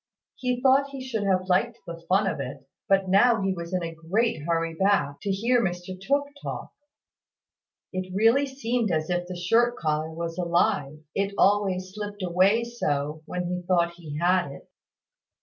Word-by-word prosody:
He 250 -1 -1
thought 275 +1 +4
he 270 -2 -7
should 220 -5 -2
have 185 -1 +1
liked 225 +6 +1
the 170 0 -8
fun 195 +3 +4
of 165 -6 -1
it; 135 0 -6 0.2
but 195 -1 +3
now 205 +3 +4
he 195 0 +1
was 170 -1 -7
in 180 -1 -1
a 165 0 -4
great 175 +4 0
hurry 165 -1 0
back, 165 -6 +1
to 205 - -3
hear 235 +6 +2
Mr 175 -1 -3
Tooke 280 +10 0
talk. - - -6 1.2
It 185 0 -4
really 225 +8 +3
seemed 245 -4 -1
as 155 +1 -1
if 175 0 -1
the 180 - -6
shirt 230 +7 +2
collar 155 0 -1
was 165 +1 -5
alive, 155 -4 +1
it 200 0 -1
always 190 -2 +2
slipped 205 -1 -6
away 185 +6 +3
so 150 -10 -2
when 180 0 -3
he 180 +1 -2
thought 170 -1 +1
he 155 -4 -7
had 175 -1 +2
it. - - -12
185 Hz, 175 wpm, -26 LUFS, 170-220 Hz, 1.2 s, thought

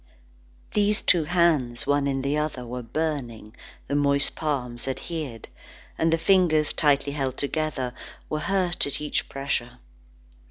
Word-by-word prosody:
These 210 0 +2
two 170 -4 +3
hands, 150 -8 +2
one 145 0 +2
in 135 -1 -1
the 140 +2 0
other, 150 -5 -2
were 125 +1 -5
burning; 120 -6 -4 0.3
the - - -3
moist 140 -1 +4
palms 130 -6 -3
adhered, 135 -3 -5 0.5
and 165 0 +1
the 165 - +3
fingers 165 -4 +3
tightly 140 -1 +2
held 135 -3 -2
together, 140 -4 -2 0.3
were 155 - -2
hurt 185 -3 +1
at 140 0 0
each 150 -1 -2
pressure. 135 -3 -3
145 Hz, 135 wpm, -25 LUFS, 130-160 Hz, 0.5 s, moist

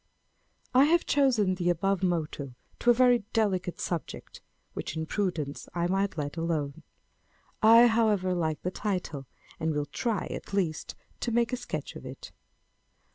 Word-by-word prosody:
I 260 +2 +7
have 335 +3 +3
chosen 240 -9 +3
the 180 -1 0
above 195 +2 +1
motto 155 -7 -2 0.2
to 240 - +2
a - - +9
very 245 0 +5
delicate 190 -5 0
subject, 170 -3 -5 0.3
which 160 - -5
in 160 - -2
prudence 160 -7 -3
I 170 0 +1
might 195 0 0
let 145 +1 -3
alone. 165 -3 -2 0.8
I, 230 +2 +8
however, 215 -5 +2
like 160 -4 -1
the 180 - -1
title; 180 - -3 0.3
and 160 -1 -1
will 145 0 0
try, 220 +6 -2
at - - -7
least, 170 -6 -1 0.2
to 240 - -2
make 235 +1 +1
a - - +3
sketch 240 - -5
of - - -9
it. 130 +1 -9
185 Hz, 155 wpm, -28 LUFS, 160-225 Hz, 0.8 s, a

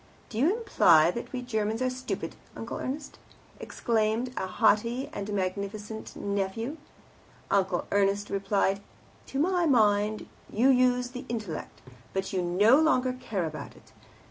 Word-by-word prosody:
"Do 220 - -4
you 340 - +3
imply 170 - +5
that 235 - -6
we 255 -1 -4
Germans 220 -2 -1
are 255 0 +1
stupid, 255 +1 -5 0.2
Uncle - - -5
Ernst?" 280 +2 -5 0.4
exclaimed 230 +2 -1
a 190 - -2
haughty 230 +6 +2
and 205 +1 -4
magnificent 205 +3 -4
nephew. 200 +8 -2 0.7
Uncle 190 -3 +1
Ernst 200 0 +1
replied, 195 0 +1 0.5
"To 270 - -5
my 350 +3 +2
mind. 215 -4 +3 0.2
You 245 +5 +3
use 250 -1 +3
the 255 +1 -7
intellect, 210 -9 -5 0.3
but 195 0 -2
you 185 - +1
no 205 +10 +5
longer 255 -5 +2
care 220 -8 -3
about 155 -1 -7
it. 110 - -20
220 Hz, 140 wpm, -28 LUFS, 200-255 Hz, 0.7 s, imply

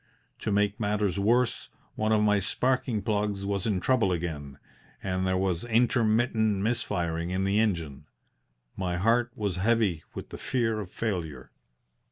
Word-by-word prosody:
To 110 - -2
make 100 0 +1
matters 105 -3 0
worse, 120 +4 +1 0.2
one 110 0 0
of 105 -1 +4
my 105 -1 +4
sparking 125 +1 0
plugs 105 -1 -1
was 100 0 -1
in 100 -4 +1
trouble 110 -2 +2
again 75 -5 -4 0.5
and 95 -1 -1
there 95 0 +1
was 95 -3 0
intermittent 110 -3 +2
missfiring 85 -7 -1
in 95 +1 -1
the 100 +2 +2
engine. 85 -10 -1 0.7
My 90 -2 -2
heart 115 +5 +2
was 100 -4 -2
heavy 100 -5 +1
with - - -7
the - - -8
fear 115 -4 0
of 100 -4 -6
failure. 85 - -4
100 Hz, 150 wpm, -28 LUFS, 90-110 Hz, 0.7 s, of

